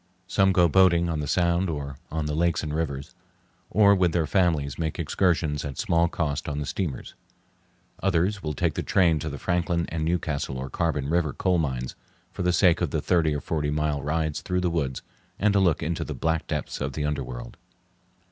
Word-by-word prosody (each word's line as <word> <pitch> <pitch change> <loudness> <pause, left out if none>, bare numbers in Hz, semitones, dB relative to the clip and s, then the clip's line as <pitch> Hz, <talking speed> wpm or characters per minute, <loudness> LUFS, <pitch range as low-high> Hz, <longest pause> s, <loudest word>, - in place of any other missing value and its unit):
Some 95 0 +3
go 90 -2 +4
boating 85 0 +4
on 80 -2 -1
the 75 - -3
Sound 85 +3 +1
or 70 -3 -5
on 80 0 -2
the 75 - -2
lakes 85 +1 +1
and 75 -1 -3
rivers, 70 -4 -3 0.6
or 100 +1 +5
with 90 -4 +2
their 85 -2 +2
families 80 -5 +1
make 80 -2 -2
excursions 80 -3 0
at 70 -2 -6
small 85 -6 +2
cost 80 -1 -2
on 70 - -3
the 75 - -2
steamers. 80 -4 -4 0.9
Others 95 +2 +1
will 75 -3 -3
take - - 0
the - - -2
train 85 -5 +3
to 80 +1 -4
the 70 - -6
Franklin 85 0 0
and 80 -1 -2
Newcastle 80 -5 -1
or 65 0 -5
Carbon 75 -4 -1
River 80 -2 +1
coal 90 -2 +1
mines 65 -5 -2 0.4
for - - -6
the 90 - +2
sake 85 -1 +4
of - - +1
the - - -1
thirty 80 -4 +2
or 75 - -3
forty 75 0 -1
mile 75 -1 0
rides 80 +1 -1
through 90 -2 -1
the 90 -1 0
woods, 70 -6 -2 0.3
and 105 0 +2
a 100 - +4
look 85 -5 +2
into 80 +1 -2
the - - -5
black 80 0 -1
depths 75 -2 -3
of 65 +1 -2
the 75 +2 -2
underworld. 65 -5 -4
80 Hz, 205 wpm, -26 LUFS, 75-85 Hz, 0.9 s, or